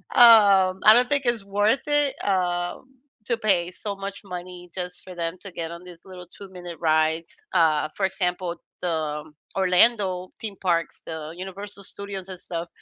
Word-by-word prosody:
Um, 200 -6 +7
I 215 - +10
don't 245 +2 +4
think 285 -1 +1
it's 240 -4 +1
worth 205 +5 +2
it, 290 -2 +2
um, 175 -2 0 0.4
to 235 - +1
pay 185 -6 +1
so 200 +2 -5
much 195 0 -6
money 180 -1 -8
just 180 -1 -5
for 185 - -10
them 165 0 -3
to 195 - -9
get 165 -1 -5
on 170 0 -8
these 175 -2 -13
little 180 -2 -10
two-minute 180 -3 -9
rides. 160 0 +1
Uh, 155 -4 +3
for 195 - +2
example, 180 -2 -1 0.3
the 155 -3 -2 0.3
Orlando 185 -1 +3
theme 215 -3 -5
parks, 170 -3 0
the 160 -1 -6
Universal 200 +2 -7
Studios 195 -1 -7
and 185 -2 -7
stuff, 170 -1 -5
185 Hz, 165 wpm, -24 LUFS, 175-200 Hz, 0.4 s, I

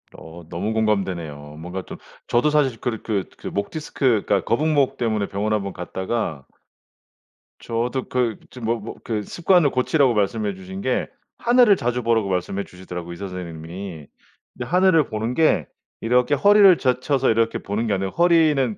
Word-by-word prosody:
어 85 +1 -11
너무 100 +6 -3
공감되네요. 85 -9 -2
뭔가 90 +3 -5
좀 - - -9 0.3
저도 120 +5 +2
사실 135 -6 +1
그렇 115 -3 -3
그 100 -4 -2
그 - - -8
목 100 0 -3
디스크가 125 -10 0
거북목 145 +2 +1
때문에 110 -4 0
병원 105 +2 -2
한번 100 -2 -2
갔다가 95 - -4 1.1
저도 120 +3 -2
그 120 -4 0
지금 125 -3 -8
뭐 115 +1 0
뭐 105 - -8
그 110 -3 -2
습관을 170 - +2
고치라고 130 0 +2
말씀해 105 0 0
주신 95 +1 -8
게 130 - 0 0.3
하늘을 240 -3 +5
자주 125 -4 -2
보라고 110 -3 +1
말씀해 95 +2 -2
주시더라고요 90 -1 -8
의사 100 +3 -6
선생님이. 85 -2 -7 0.5
근데 120 - -6
하늘을 180 0 +4
보는 110 +2 -2
게 160 +2 +2 0.3
이렇게 125 +5 +2
허리를 200 +2 +6
젖혀서 130 0 +1
이렇게 115 0 +1
보는 110 +3 -2
게 105 - +1
아니라 95 0 -1
허리는 155 -9 +3
115 Hz, 350 characters per minute, -22 LUFS, 95-130 Hz, 1.1 s, 허리를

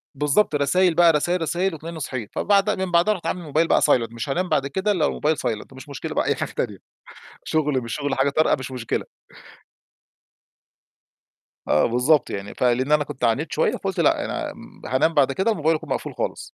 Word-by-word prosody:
بالضبط، 150 +5 +2
رسايل 165 +5 +2
بقى 170 0 +6
رسايل 175 +4 0
رسايل 175 +4 0
وتلاقيني 160 +1 -8
صحيت 130 -7 -5
فبعدها 205 +1 +2
من 190 -1 -3
بعدها 175 +5 +4
رُحت 180 -5 -9
عامل 180 +2 -1
الموبايل 160 +1 0
بقى - - +3
silent. 115 -5 +2
مش 115 +5 -5
هانام 180 +6 -1
بعد 140 0 +1
كده 190 +8 -1
إلا 175 -7 +1
والموبايل 155 +1 0
silent، 110 -3 -3
ومش 130 +3 -12
مشكلة 140 - -6
بقى - - +1
أي - - +1
حاجة - - -4
تانية، - - -3 0.7
شغل 150 -4 0
مش 115 -1 -5
شغل، 145 -1 -2
حاجة 135 +1 +2
طارئة 155 +3 +2
مش 130 0 -7
مشكلة. 125 -3 -3 2.6
آه، 75 - +3
بالضبط 125 +5 +2
يعني، 100 0 -6
فلإن 125 +3 +1
أنا 150 -1 +4
كنت 130 -2 -9
عانيت 115 -1 +1
شوية - - +1
فقلت - - -4
لأ، - - +2
أنا - - -4 0.3
هانام 130 +6 +1
بعد 140 -3 +3
كده 190 +10 +1
الموبايل 160 -4 +1
يكون 160 -1 -7
مقفول - - -3
خالص. - - -4
150 Hz, 190 wpm, -23 LUFS, 130-170 Hz, 2.6 s, بقى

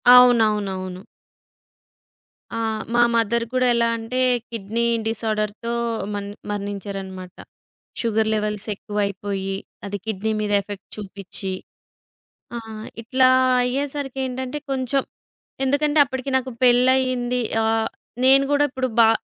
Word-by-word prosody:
అవునవునవును. 210 -7 +4 1.6
ఆ! - - -1 0.3
మా 240 - +4
మదర్ 230 +1 +2
గూడా 255 -1 +2
ఎలా 235 0 +3
అంటే, 225 +3 -3 0.3
కిడ్నీ 230 +1 -2 0.2
డిజార్డర్‌తో 220 +1 -2 0.4
మన్ 200 0 -3 0.2
మరణించారనమాట. 195 -2 -5 0.7
షుగర్ 220 -1 +1
లెవెల్స్ 210 0 -1
ఎక్కువైపోయి 200 -1 -2 0.3
అది 200 0 -3
కిడ్నీ 220 0 -1
మీద 210 -1 -1
ఎఫెక్ట్ 200 0 -9
చూపిచ్చి. 195 -1 -5 1.1
ఆహ్, 220 -1 -7 0.2
ఇట్లా 255 +3 +3 0.4
అయ్యేసరికేంటంటే 265 0 -2
కొంచెం 265 +1 +1 0.6
ఎందుకంటే 290 +3 +2
అప్పటికి 260 0 -4
నాకు 260 0 -3
పెళ్లయింది 250 0 +3 0.2
ఆహ్, 225 0 +1 0.3
నేను 270 +1 +7
గూడా 290 0 +4
ఇప్పుడు 260 0 -1
బా 225 -1 +8
225 Hz, 100 wpm, -23 LUFS, 205-255 Hz, 1.6 s, బా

